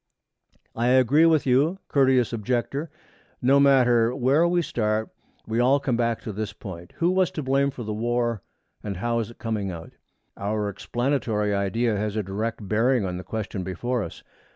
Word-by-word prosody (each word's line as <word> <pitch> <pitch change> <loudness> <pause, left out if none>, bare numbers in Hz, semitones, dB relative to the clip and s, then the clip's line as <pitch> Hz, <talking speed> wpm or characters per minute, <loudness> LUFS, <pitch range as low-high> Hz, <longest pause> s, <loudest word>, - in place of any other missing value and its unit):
'I 115 +1 0
agree 130 +5 +5
with 160 -3 +3
you, 140 +8 +2
courteous 130 -4 +3
Objector. 125 +7 -2 0.5
No 135 +3 +4
matter 125 -4 +4
where 140 +6 +3
we 175 0 +1
start, 110 -5 -1 0.4
we 110 +1 -1
all 130 +3 +4
come 130 -3 -1
back 115 -1 0
to 110 - -6
this 105 0 -4
point: 95 -6 -10
Who 170 +1 +1
was 185 -1 +2
to 155 - -5
blame 135 +1 +2
for 130 -3 -7
the 110 -1 -4
War, 120 0 -1 0.4
and 100 -3 -5
how 115 +4 0
is 110 -1 -3
it 120 - -14
coming 110 -4 -3
out? 85 -2 -8 0.4
Our 105 +1 -2
explanatory 110 -1 -1
idea 105 +3 0
has 105 0 -2
a 110 - -1
direct 105 +2 -4
bearing 115 +2 +2
on 90 -1 -3
the 90 - -7
question 105 -3 -4
before 120 +7 -2
us. 85 - -7
115 Hz, 175 wpm, -25 LUFS, 105-130 Hz, 0.5 s, agree